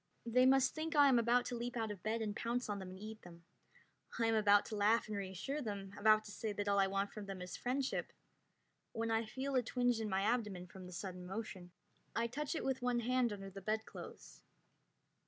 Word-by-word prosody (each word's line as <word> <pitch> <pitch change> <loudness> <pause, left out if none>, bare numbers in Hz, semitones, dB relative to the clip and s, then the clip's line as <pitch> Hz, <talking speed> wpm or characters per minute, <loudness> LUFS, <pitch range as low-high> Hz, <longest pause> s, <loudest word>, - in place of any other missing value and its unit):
They 250 +2 +5
must 265 -1 +5
think 320 +1 -3
I 290 -1 +7
am 250 -3 +5
about 240 +2 +3
to 250 - -3
leap 240 +1 -3
out 220 -2 -1
of 200 -4 -7
bed 225 +1 -1
and 210 -1 -3
pounce 240 0 -1
on 205 -1 -2
them 190 -1 -7
and 185 - -9
eat 215 +1 -8
them. 170 -1 -13 0.7
I 230 - +2
am 225 - +3
about 205 -2 +5
to 215 - -5
laugh 215 +3 +3
and 215 - -3
reassure 200 +9 -3
them, 200 -5 -5
about 215 0 +5
to 210 - -9
say 220 +1 -3
that 205 0 -3
all 200 0 +3
I 195 - +5
want 195 +1 -1
from 210 -2 -7
them 195 -1 -5
is 180 0 -6
friendship, 260 +2 -1 0.8
when 225 0 -1
I 225 0 +2
feel 265 +5 -3
a 255 - +4
twinge 245 0 +1
in 215 - -2
my 190 0 +1
abdomen 210 -5 0
from 185 0 -11
the - - -10
sudden 180 0 -6
motion. 190 -3 -6 0.4
I 230 - +2
touch 290 +7 -3
it - - -2
with 265 -1 0
one 245 -1 +1
hand 250 0 +2
under 195 -1 -6
the 195 +1 -8
bedclothes. 215 +3 -5
220 Hz, 230 wpm, -37 LUFS, 200-245 Hz, 0.8 s, I